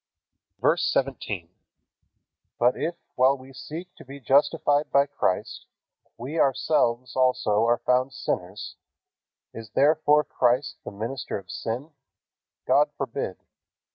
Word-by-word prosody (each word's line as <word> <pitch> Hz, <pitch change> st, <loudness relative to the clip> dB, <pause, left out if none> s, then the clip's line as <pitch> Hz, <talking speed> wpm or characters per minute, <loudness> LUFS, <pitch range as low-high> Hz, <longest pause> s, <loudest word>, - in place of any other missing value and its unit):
VERSE -, -, +3 dB
17. 110 Hz, -10 st, -2 dB, 1.1 s
But 120 Hz, +1 st, +3 dB
if, 170 Hz, +1 st, -2 dB, 0.2 s
while 130 Hz, +2 st, +4 dB
we 130 Hz, +1 st, -14 dB
seek 165 Hz, +7 st, -8 dB
to -, -, -12 dB
be 140 Hz, +1 st, -10 dB
justified 145 Hz, +3 st, +2 dB
by 140 Hz, 0 st, +5 dB
Christ, 95 Hz, -9 st, -2 dB, 0.5 s
we 140 Hz, +7 st, -4 dB
ourselves 130 Hz, -3 st, +1 dB
also 115 Hz, -4 st, +2 dB
are 120 Hz, 0 st, +3 dB
found 130 Hz, +1 st, +1 dB
sinners, 95 Hz, -2 st, -4 dB, 0.8 s
is 115 Hz, -1 st, -9 dB
therefore 150 Hz, +1 st, +4 dB
Christ 125 Hz, +1 st, +1 dB
the -, -, -6 dB
minister 115 Hz, +5 st, -4 dB
of 95 Hz, -2 st, -10 dB
sin? 125 Hz, +8 st, -4 dB, 0.7 s
God -, -, +4 dB
forbid. -, -, -3 dB
130 Hz, 115 wpm, -25 LUFS, 115-145 Hz, 1.1 s, by